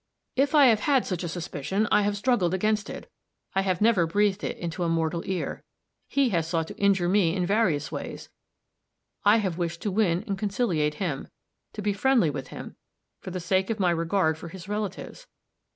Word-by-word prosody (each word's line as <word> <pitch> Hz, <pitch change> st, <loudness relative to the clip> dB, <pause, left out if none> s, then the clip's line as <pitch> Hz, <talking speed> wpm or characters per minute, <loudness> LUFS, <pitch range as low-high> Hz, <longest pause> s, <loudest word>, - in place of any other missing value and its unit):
"If 280 Hz, +4 st, +2 dB
I 290 Hz, -2 st, +8 dB
have 225 Hz, -4 st, +5 dB
had 270 Hz, +1 st, +2 dB
such 185 Hz, -2 st, -3 dB
a -, -, -2 dB
suspicion, 175 Hz, +4 st, -2 dB
I -, -, +5 dB
have 205 Hz, 0 st, 0 dB
struggled 200 Hz, -6 st, +1 dB
against 210 Hz, +2 st, 0 dB
it; -, -, -8 dB, 0.5 s
I 195 Hz, -, +2 dB
have 185 Hz, -2 st, -1 dB
never 210 Hz, -7 st, +4 dB
breathed 205 Hz, +2 st, +1 dB
it -, -, -3 dB
into 170 Hz, +1 st, -4 dB
mortal 165 Hz, 0 st, 0 dB
ear. 190 Hz, -1 st, -3 dB, 0.4 s
He 275 Hz, -2 st, +2 dB
has 165 Hz, -6 st, 0 dB
sought 165 Hz, -1 st, 0 dB
to -, -, -9 dB
injure 195 Hz, -3 st, +2 dB
me 185 Hz, -2 st, +3 dB
in 180 Hz, -2 st, 0 dB
various 180 Hz, -8 st, +1 dB
ways; -, -, -6 dB, 0.9 s
I 205 Hz, +2 st, +6 dB
have 190 Hz, -5 st, -2 dB
wished 170 Hz, -1 st, -3 dB
to 205 Hz, -, -1 dB
win 185 Hz, -3 st, +1 dB
and 200 Hz, -4 st, -3 dB
conciliate 190 Hz, -8 st, 0 dB
him; 150 Hz, -6 st, -3 dB, 0.5 s
to 210 Hz, -, -6 dB
be 205 Hz, 0 st, +1 dB
friendly 225 Hz, -, +3 dB
with 135 Hz, -2 st, -6 dB
him, -, -, -9 dB, 0.4 s
for -, -, -8 dB
the 185 Hz, 0 st, -4 dB
sake 190 Hz, +3 st, 0 dB
of 225 Hz, -1 st, -2 dB
my 180 Hz, -3 st, +3 dB
regard 165 Hz, -1 st, +1 dB
for 170 Hz, -, -8 dB
his 180 Hz, +2 st, -10 dB
relatives. 210 Hz, -2 st, -5 dB
190 Hz, 195 wpm, -26 LUFS, 170-210 Hz, 0.9 s, I